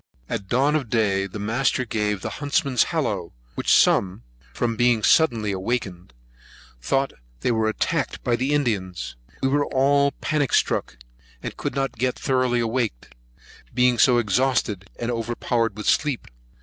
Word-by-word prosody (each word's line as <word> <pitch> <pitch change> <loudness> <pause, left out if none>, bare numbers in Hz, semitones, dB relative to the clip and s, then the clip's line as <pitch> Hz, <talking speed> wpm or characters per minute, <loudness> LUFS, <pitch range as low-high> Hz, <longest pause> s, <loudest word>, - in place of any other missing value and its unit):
At 95 - -4
dawn 135 +8 +2
of 140 -7 -1
day, 100 -4 +1
the 100 - -8
master 120 +5 0
gave 105 -3 -1
the - - -4
huntsman's 140 -3 +2
hollow, - - -2 0.2
which - - -1
some, 90 -10 +3 0.3
from 115 - -1
being 120 -2 +2
suddenly 115 -8 +3
awaked, 105 +5 -1 0.9
thought 135 - 0 0.3
they - - +1
were 110 -1 +1
attacked 110 - -2
by 120 - +2
the 130 +4 -1
Indians. 105 - -1 0.3
We 135 - +3
were 145 +1 +1
all 140 +1 +3
panic 150 -5 -1
struck, - - +1 0.5
and - - -5
could - - -4
not 135 -4 -2
get 125 +1 0
thoroughly 130 -2 +1
awaked, 115 - -2 0.6
being 125 -1 +3
so 125 -2 +5
exhausted, 110 -4 0
and 120 0 -2
overpowered 115 -1 -1
with 105 - -6
sleep. 145 -5 +1
120 Hz, 150 wpm, -23 LUFS, 105-135 Hz, 0.9 s, so